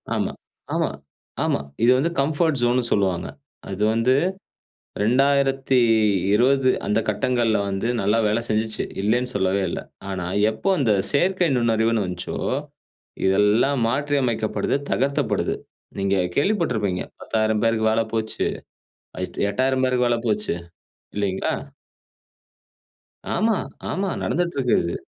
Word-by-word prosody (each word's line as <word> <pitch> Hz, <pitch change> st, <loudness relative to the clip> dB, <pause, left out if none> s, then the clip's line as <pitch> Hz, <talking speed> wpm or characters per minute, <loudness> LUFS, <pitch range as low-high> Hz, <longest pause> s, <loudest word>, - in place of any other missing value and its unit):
ஆமா, -, -, -1 dB, 0.4 s
ஆமா, -, -, +1 dB, 0.5 s
ஆமா. -, -, +1 dB, 0.2 s
இது 120 Hz, -, +6 dB
வந்து 150 Hz, +6 st, +1 dB
கம்ஃபர்ட் 155 Hz, -1 st, +1 dB
ஜோன்னு 120 Hz, +1 st, +2 dB
சொல்லுவாங்க. 95 Hz, -4 st, +1 dB, 0.4 s
அது 100 Hz, +2 st, -2 dB
வந்து 115 Hz, +3 st, +3 dB, 0.9 s
2020 130 Hz, -2 st, +3 dB, 0.2 s
அந்த 105 Hz, -, +1 dB
கட்டங்கள்ல 115 Hz, +1 st, +1 dB
வந்து 95 Hz, +4 st, -2 dB
நல்லா 105 Hz, +3 st, +2 dB
வேலை 110 Hz, +3 st, +1 dB
செஞ்சுச்சு. 110 Hz, 0 st, -1 dB, 0.2 s
இல்லைன்னு 120 Hz, +5 st, +1 dB
சொல்லவே 95 Hz, 0 st, +1 dB
இல்ல. -, -, -3 dB, 0.3 s
ஆனா, 90 Hz, -2 st, -3 dB, 0.2 s
எப்போ 110 Hz, -, -3 dB
அந்த 115 Hz, -6 st, +3 dB, 0.2 s
செயற்கை 180 Hz, +4 st, +2 dB
நுண்ணறிவுன்னு 115 Hz, -2 st, +2 dB
வஞ்ச்சோ, 90 Hz, -1 st, -5 dB, 0.9 s
இதெல்லாம் 105 Hz, +8 st, +3 dB
மாற்றியமைக்கப்படுது, 130 Hz, -4 st, 0 dB
தகர்த்தப்படுது. 140 Hz, +2 st, 0 dB, 0.4 s
நீங்க 100 Hz, 0 st, +1 dB, 0.2 s
கேள்விப்பட்டிருப்பீங்க 125 Hz, -, +1 dB, 0.2 s
10,000 110 Hz, -1 st, 0 dB
பேருக்கு 110 Hz, -1 st, +2 dB
வேல 115 Hz, +1 st, +2 dB
போச்சு, 110 Hz, -1 st, -1 dB, 0.7 s
அ, -, -, -4 dB, 0.3 s
8,000 130 Hz, +4 st, +1 dB
பேருக்கு 125 Hz, -1 st, +2 dB
வேல 120 Hz, -, +2 dB
போச்சு. 105 Hz, -5 st, 0 dB, 0.6 s
இல்லைங்களா? 100 Hz, -2 st, -1 dB, 1.8 s
ஆமா, 220 Hz, -1 st, +2 dB, 0.3 s
ஆமா. 195 Hz, 0 st, -1 dB
நடந்துட்டு 170 Hz, -3 st, -1 dB
இருக்கறது. 120 Hz, -10 st, +1 dB
115 Hz, 110 wpm, -23 LUFS, 105-135 Hz, 1.8 s, இது